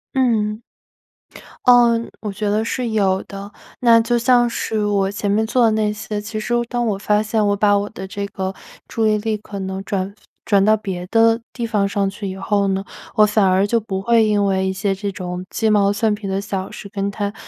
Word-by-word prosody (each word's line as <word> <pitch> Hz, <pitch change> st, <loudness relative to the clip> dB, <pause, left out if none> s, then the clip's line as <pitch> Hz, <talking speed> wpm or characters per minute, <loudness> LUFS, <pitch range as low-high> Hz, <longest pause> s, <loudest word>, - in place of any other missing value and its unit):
嗯。 220 Hz, -4 st, +1 dB, 1.0 s
呃， 240 Hz, -2 st, +6 dB, 0.2 s
我 210 Hz, -2 st, -4 dB
觉 205 Hz, +1 st, -2 dB
得 215 Hz, +1 st, +1 dB
是 240 Hz, +1 st, -2 dB
有 195 Hz, -3 st, +1 dB
的， 200 Hz, +1 st, -9 dB, 0.3 s
那 230 Hz, -2 st, +6 dB
就 240 Hz, +1 st, +1 dB
像 240 Hz, 0 st, +4 dB
是 220 Hz, -2 st, -2 dB
我 200 Hz, -1 st, +1 dB
前 205 Hz, 0 st, -3 dB
面 215 Hz, +2 st, +2 dB
做 240 Hz, +1 st, +3 dB
的 225 Hz, -, +4 dB
那 215 Hz, -1 st, +1 dB
些， 210 Hz, 0 st, -5 dB
其 215 Hz, +1 st, -5 dB
实 225 Hz, +3 st, -3 dB, 0.2 s
当 240 Hz, -1 st, -1 dB
我 210 Hz, -4 st, 0 dB
发 210 Hz, 0 st, +2 dB
现 215 Hz, 0 st, 0 dB
我 205 Hz, -, +2 dB
把 205 Hz, 0 st, +3 dB
我 200 Hz, +1 st, -2 dB
的 190 Hz, -3 st, -8 dB
这 200 Hz, +1 st, -4 dB
个 190 Hz, -1 st, -4 dB, 0.3 s
注 225 Hz, -1 st, 0 dB
意 215 Hz, 0 st, +3 dB
力 215 Hz, 0 st, -2 dB
可 205 Hz, -1 st, -9 dB
能 190 Hz, 0 st, -4 dB
转 195 Hz, 0 st, -3 dB, 0.3 s
转 200 Hz, -2 st, +3 dB
到 215 Hz, +2 st, +4 dB
别 185 Hz, -4 st, -5 dB
的 225 Hz, +2 st, +3 dB
地 240 Hz, -, -4 dB
方 210 Hz, -3 st, 0 dB
上 200 Hz, -1 st, 0 dB
去 205 Hz, 0 st, -6 dB
以 190 Hz, -, -5 dB
后 200 Hz, 0 st, 0 dB
呢， 195 Hz, 0 st, -1 dB, 0.3 s
我 215 Hz, -, +6 dB
反 210 Hz, 0 st, +2 dB
而 190 Hz, +1 st, +3 dB
就 230 Hz, +3 st, +1 dB
不 195 Hz, -3 st, -4 dB
会 230 Hz, 0 st, +4 dB
因 205 Hz, -1 st, +2 dB
为 190 Hz, -1 st, +1 dB
一 -, -, 0 dB
些 195 Hz, +1 st, -1 dB
这 200 Hz, +1 st, -4 dB
种 180 Hz, -1 st, -5 dB
鸡 225 Hz, -, -1 dB
毛 200 Hz, -2 st, +3 dB
蒜 215 Hz, +1 st, +1 dB
皮 210 Hz, -1 st, -5 dB
的 190 Hz, 0 st, -1 dB
小 195 Hz, -2 st, -4 dB
事 200 Hz, -, -9 dB
跟 200 Hz, -1 st, -2 dB
他 200 Hz, 0 st, -3 dB
210 Hz, 235 characters per minute, -20 LUFS, 195-220 Hz, 1.0 s, 呃